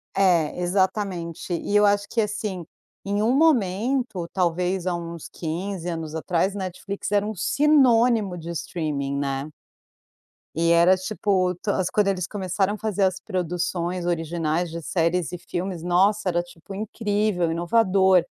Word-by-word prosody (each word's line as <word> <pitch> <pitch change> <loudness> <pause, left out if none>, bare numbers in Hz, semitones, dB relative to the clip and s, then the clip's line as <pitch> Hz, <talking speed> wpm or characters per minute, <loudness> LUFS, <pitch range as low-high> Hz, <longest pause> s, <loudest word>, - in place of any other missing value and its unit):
É, 180 -5 +2
exatamente 180 -2 -1
e 190 +4 -2
eu 210 0 +6
acho 205 0 +2
que, 230 - +1
assim, 210 -4 -3 0.4
em 205 +1 0
um 240 +4 +2
momento 240 - +1
talvez 180 0 0
há 180 - +1
uns 170 -1 -6
15 175 +2 -4
anos 160 -2 -5
atrás 175 +4 0
Netflix 195 +1 -5
era 205 0 +2
um 215 0 -4
sinônimo 240 - +3
de 170 0 -8
streaming, 150 -4 -3
né. 140 +1 -2 1.1
E 165 +1 +2
era, 170 +2 +6
tipo, 185 -1 0
to - - -3
as 185 -2 0
quando 210 -1 +2
eles 185 -3 0
começaram 195 0 -1
a - - -5
fazer 210 -2 -1
as 190 -1 +1
produções 180 -1 -2
originais 165 0 -1
de 170 +1 -5
séries 170 -1 0
e 180 - -5
filmes, 175 0 -5
nossa, 190 +3 +2
era, 175 -1 +1
tipo, 175 +2 -12
incrível, 205 -4 -1
inovador, 190 +1 +3
185 Hz, 145 wpm, -24 LUFS, 170-205 Hz, 1.1 s, eu